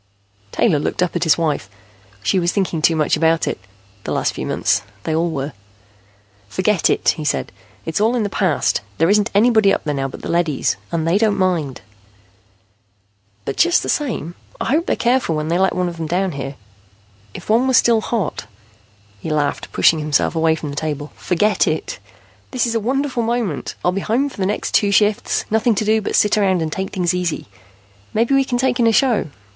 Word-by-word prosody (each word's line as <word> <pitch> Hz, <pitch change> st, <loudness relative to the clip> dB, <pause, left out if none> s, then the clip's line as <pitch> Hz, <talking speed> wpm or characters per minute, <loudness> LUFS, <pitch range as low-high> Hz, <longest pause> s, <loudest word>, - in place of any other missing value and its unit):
Taylor 175 Hz, -11 st, +2 dB
looked 165 Hz, -, -1 dB
up 180 Hz, -, -2 dB
at 175 Hz, 0 st, 0 dB
his 160 Hz, -, +4 dB
wife. 150 Hz, -, -1 dB, 0.5 s
She 185 Hz, -, +2 dB
was 175 Hz, 0 st, +1 dB
thinking 185 Hz, -5 st, -1 dB
too 165 Hz, +1 st, +3 dB
much 155 Hz, -2 st, +2 dB
about 165 Hz, +1 st, +2 dB
it, -, -, -2 dB, 0.4 s
the -, -, -4 dB
last -, -, 0 dB
few -, -, -5 dB
months. -, -, +1 dB, 0.2 s
They 160 Hz, -, -2 dB
all 165 Hz, +2 st, +1 dB
were. 140 Hz, -2 st, -4 dB, 1.0 s
"Forget 190 Hz, -, +1 dB
it," -, -, +2 dB
he 155 Hz, -, -5 dB
said. 150 Hz, -, -1 dB, 0.3 s
"It's 160 Hz, +4 st, -2 dB
all 225 Hz, +3 st, +3 dB
in 235 Hz, -, 0 dB
the -, -, 0 dB
past. 185 Hz, -, 0 dB, 0.2 s
There 165 Hz, +4 st, +3 dB
isn't 210 Hz, +1 st, +3 dB
anybody 220 Hz, -2 st, +4 dB
up -, -, 0 dB
there 150 Hz, -, -2 dB
now 135 Hz, -1 st, -2 dB
but 135 Hz, -, -10 dB
the -, -, -4 dB
leadys, 170 Hz, -5 st, 0 dB, 0.2 s
and 165 Hz, -1 st, -1 dB
they 175 Hz, +5 st, +3 dB
don't 215 Hz, -2 st, +2 dB
mind." 170 Hz, -8 st, -1 dB, 1.6 s
"But 135 Hz, -, -4 dB
just 345 Hz, 0 st, +3 dB
the -, -, -4 dB
same, 230 Hz, -, -2 dB, 0.3 s
I -, -, -2 dB
hope 320 Hz, +4 st, +1 dB
they're -, -, +1 dB
careful 240 Hz, -9 st, +1 dB
when 155 Hz, +1 st, -2 dB
they 170 Hz, +2 st, +1 dB
let 190 Hz, -1 st, +2 dB
one 180 Hz, 0 st, 0 dB
of 170 Hz, -1 st, -6 dB
them 160 Hz, -1 st, -4 dB
down 185 Hz, +3 st, 0 dB
here. 140 Hz, -1 st, -6 dB, 0.8 s
If -, -, -9 dB
one 230 Hz, +4 st, +3 dB
were 260 Hz, -, +3 dB
still 230 Hz, -2 st, +4 dB
hot 210 Hz, -, -3 dB, 0.4 s
" 100 Hz, -1 st, -32 dB
He -, -, -5 dB
laughed, 150 Hz, -2 st, -1 dB
pushing 160 Hz, -, +4 dB
himself 150 Hz, +1 st, +1 dB
away 160 Hz, 0 st, +2 dB
from 150 Hz, -2 st, -6 dB
the -, -, -7 dB
table. 150 Hz, -1 st, -4 dB
"Forget 205 Hz, +4 st, +1 dB
it. -, -, -2 dB, 0.5 s
This 255 Hz, -2 st, 0 dB
is 235 Hz, -, -1 dB
a 225 Hz, -, +1 dB
wonderful 260 Hz, +2 st, -1 dB
moment; 230 Hz, -, -2 dB
I'll 180 Hz, -, +4 dB
be 195 Hz, +2 st, -2 dB
home 250 Hz, +8 st, 0 dB
for -, -, -14 dB
the 190 Hz, -2 st, 0 dB
next 210 Hz, -, -3 dB
two 205 Hz, -, +3 dB
shifts. 210 Hz, +1 st, +1 dB
Nothing 220 Hz, +1 st, +2 dB
to 215 Hz, -, -1 dB
do 220 Hz, +1 st, +2 dB
but -, -, -2 dB
sit 210 Hz, 0 st, +3 dB
around 190 Hz, -4 st, +2 dB
and 155 Hz, -, -3 dB
take 190 Hz, +3 st, -3 dB
things 180 Hz, -2 st, 0 dB
easy. 180 Hz, -3 st, -2 dB, 0.7 s
Maybe 230 Hz, +5 st, +2 dB
we 275 Hz, 0 st, +4 dB
can 250 Hz, -2 st, -2 dB
take 250 Hz, 0 st, 0 dB
in 235 Hz, -, +4 dB
a -, -, +5 dB
show. 235 Hz, -, +2 dB
185 Hz, 210 wpm, -19 LUFS, 160-220 Hz, 1.6 s, a